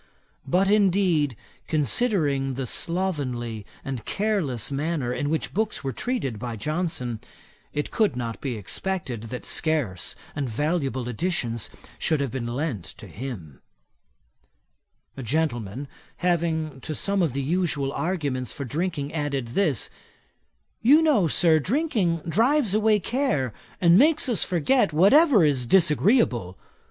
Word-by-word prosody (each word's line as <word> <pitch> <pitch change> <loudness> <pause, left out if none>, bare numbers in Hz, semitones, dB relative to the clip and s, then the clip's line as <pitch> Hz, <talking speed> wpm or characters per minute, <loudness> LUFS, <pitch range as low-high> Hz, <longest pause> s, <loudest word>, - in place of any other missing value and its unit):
But, 185 +7 +2
indeed, 185 - +3 0.3
considering 145 - +1
the 135 0 -3
slovenly 130 - -1 0.2
and 130 -4 -4
careless 190 - -1
manner 140 -3 -1
in 145 +3 -2
which 160 +1 -2
books 220 -2 -1
were 135 -1 -2
treated 185 - -2
by 120 0 -4
Johnson, 130 - -2 0.5
it 150 - -3
could 215 - +2
not 115 -2 -4
be 130 -5 -3
expected 125 - -3
that 125 +2 -7
scarce 145 - -1 0.2
and 140 -3 -2
valuable 135 -1 -1
editions 120 - -1 0.3
should 155 - +1
have 140 -4 -1
been 130 -3 -3
lent 125 - -2
to - - -10
him. 95 - -8 1.5
A 135 - -6
gentleman 130 -2 -2 0.3
having 160 -5 -1
to 155 - -5
some 200 +4 +1
of 160 -7 +1
the 140 0 -2
usual 150 -3 0
arguments 145 - -2
for 140 - -5
drinking 150 +1 -3
added 140 -6 -2
this: 145 - +1 0.9
'You 290 +8 +6
know, 255 - +4
Sir, 160 0 +4
drinking 200 - 0
drives 230 - +2
away 215 0 +3
care, 205 - -1 0.3
and 175 +1 +6
makes 305 +2 +4
us 240 -5 +2
forget 180 - +2
whatever 210 - +6
is 135 -5 +1
disagreeable. 150 - +3
155 Hz, 130 wpm, -25 LUFS, 130-190 Hz, 1.5 s, You